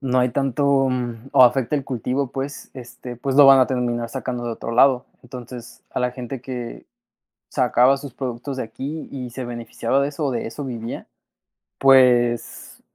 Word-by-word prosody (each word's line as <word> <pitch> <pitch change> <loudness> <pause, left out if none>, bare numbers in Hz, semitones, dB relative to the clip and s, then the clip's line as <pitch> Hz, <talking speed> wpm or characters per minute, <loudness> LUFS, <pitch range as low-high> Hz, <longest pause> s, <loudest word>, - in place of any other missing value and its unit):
no 130 -2 0
hay 125 0 +3
tanto, 135 +1 +1
mm, 120 -1 -4
o - - +7
afecta 125 +2 +2
el 140 - -3
cultivo, 130 +1 -2
pues, 135 +1 -6
este, 125 0 -9
pues, 130 +3 -3
lo 145 - +9
van 135 -1 +8
a 130 - +4
terminar 120 -2 -2
sacando 125 0 -4
de 120 - -2
otro 115 - -6
lado. 125 +1 +4 0.2
Entonces, 125 -1 -10
a - - -3
la 125 0 +1
gente 125 0 -7
que 125 -2 -7 0.6
sacaba 130 +1 +3
sus 140 -3 -9
productos 130 +1 -5
de - - -2
aquí 140 +8 -6
y 130 -3 -6
se 125 +1 -6
beneficiaba 120 +3 -2
de 140 - +1
eso, 150 +1 -4
o 135 - 0
de 120 -2 -3
eso 140 +5 -6
vivía, 115 -3 -6 0.7
pues 120 -3 +3
125 Hz, 180 wpm, -22 LUFS, 120-135 Hz, 0.7 s, lo